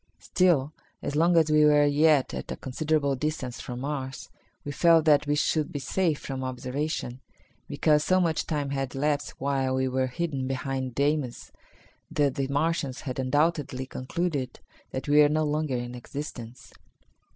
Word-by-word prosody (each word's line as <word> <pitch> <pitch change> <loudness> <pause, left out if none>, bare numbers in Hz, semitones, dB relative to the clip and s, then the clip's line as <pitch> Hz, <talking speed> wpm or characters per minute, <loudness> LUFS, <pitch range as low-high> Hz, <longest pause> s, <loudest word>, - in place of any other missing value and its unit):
Still, 160 -6 +2 0.3
as 145 - -3
long 170 +2 +4
as 160 -2 +4
we 150 0 +5
were 150 -1 +5
yet 145 -1 +3
at - - -5
a - - -2
considerable 140 +1 0
distance 135 -3 -3
from 125 0 -6
Mars, 135 -2 -5 0.3
we 145 - -3
felt 165 +1 +4
that 150 -1 +4
we 145 - +2
should 150 +1 0
be - - -4
safe 155 +4 0
from 135 -1 -5
observation, 130 0 -3 0.5
because 150 -1 +2
so 185 0 +3
much 165 -3 0
time 145 -3 -2
had 135 -2 -3
elapsed 145 +1 -1
while 135 -1 0
we 130 0 +1
were 130 0 0
hidden 135 -1 -3
behind 130 -1 -3
Deimos 140 -3 -1 0.6
that 145 -3 +1
the 135 0 -2
Martians 145 -1 -1
had 130 -3 -5
undoubtedly 145 0 0
concluded 135 0 -3 0.3
that 130 - -5
we 145 +1 +6
were 145 - +6
no 155 +1 +1
longer 150 -3 -1
in 120 0 -5
existence. 125 -1 -8
145 Hz, 165 wpm, -27 LUFS, 130-155 Hz, 0.6 s, we